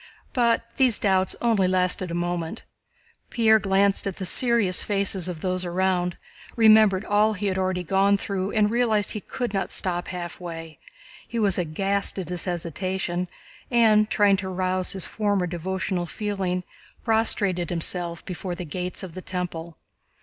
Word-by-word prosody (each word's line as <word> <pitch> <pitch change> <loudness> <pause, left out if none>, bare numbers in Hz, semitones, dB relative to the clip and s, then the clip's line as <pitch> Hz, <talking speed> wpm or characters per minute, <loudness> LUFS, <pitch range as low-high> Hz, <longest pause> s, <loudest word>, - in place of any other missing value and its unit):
But 235 -2 +2
these 255 -5 +4
doubts 190 -2 +1
only 220 -6 +3
lasted 185 0 +1
a 170 - -4
moment. 175 -1 -3 0.7
Pierre 220 -2 +4
glanced 195 0 +2
at 195 - -3
the 190 - -4
serious 230 -2 +4
faces 195 -3 0
of 170 -4 -6
those 185 -1 -1
around, 180 0 0 0.4
remembered 215 -3 +5
all 210 +1 +3
he 205 0 -4
had 190 -1 0
already 185 -1 -1
gone 195 +3 +3
through, 195 -1 -3
and 210 -1 +2
realized 225 -4 +1
that - - +3
he 215 - -3
could 245 0 -4
not 195 - -1
stop 175 -2 -2
halfway. 170 -3 -7 0.5
He 235 - -5
was 205 -4 +3
aghast 195 +5 -1
at 180 -3 -4
his 180 -1 -2
hesitation 180 +1 -3 0.4
and, 220 -3 +4
trying 205 -2 +3
to 190 0 -4
arouse 185 0 -1
his 190 -2 -3
former 205 -4 0
devotional 180 +1 -3
feeling, 190 -2 -3 0.4
prostrated 200 -6 +1
himself 170 0 0
before 180 -1 -5
the 175 0 -6
Gates 180 +5 -5
of 180 -3 -8
the 185 - -7
Temple. 170 -3 -5
190 Hz, 155 wpm, -24 LUFS, 180-205 Hz, 0.7 s, remembered